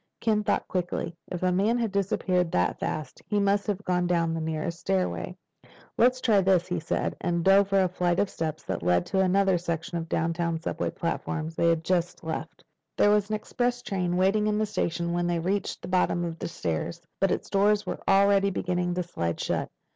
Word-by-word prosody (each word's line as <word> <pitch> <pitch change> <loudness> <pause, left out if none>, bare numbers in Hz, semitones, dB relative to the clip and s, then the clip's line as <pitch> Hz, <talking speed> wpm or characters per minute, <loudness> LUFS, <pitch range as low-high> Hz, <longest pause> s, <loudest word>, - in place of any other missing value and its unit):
Ken 215 -2 +1
thought - - 0
quickly. 175 -2 -2
If 180 - -5
the 185 0 +2
man 205 +6 +2
had 230 -3 -1
disappeared 185 -3 0
that 90 - +1
fast, 155 -4 -4
he 210 -2 +1
must 200 0 +1
have 205 -1 -2
gone 180 -1 +1
down 170 -2 +1
the 165 - -2
nearest 160 +1 -3
stairway. 90 - -1 0.6
"Let's 255 +2 +4
try 215 -6 +3
this," 185 -2 +3
he 180 -1 -1
said, 160 - -2
and 170 -1 0
dove 195 +1 +5
for 195 -1 +3
a - - +2
flight 175 -1 0
of 205 - +2
steps 160 -3 -4
that - - -3
led 90 0 +2
to 190 - -1
another 190 -1 +3
section 170 +1 -3
of 165 - -4
the - - -2
downtown 165 0 0
subway 165 - -2
platform 165 -1 -3
they 165 +1 +1
had 165 -1 +1
just 175 0 -1
left. 160 +1 -5 0.3
There 205 - +5
was 210 0 +2
an 215 - 0
express 245 +3 -2
train 180 -2 -1
waiting 200 +3 +3
in 210 0 +1
the 215 - +1
station 170 -4 -2
when 175 0 0
they 175 -1 +1
reached 190 +5 -2
the - - -5
bottom 180 -1 +1
of 165 -1 -5
the - - -3
stairs, 85 - -3 0.2
but 195 - +3
its - - -2
doors 205 +1 +2
were - - -4
already 200 0 +4
beginning 180 -1 -1
to 180 - -1
slide 85 - -3
shut. - - -1
180 Hz, 210 wpm, -27 LUFS, 165-200 Hz, 0.6 s, dove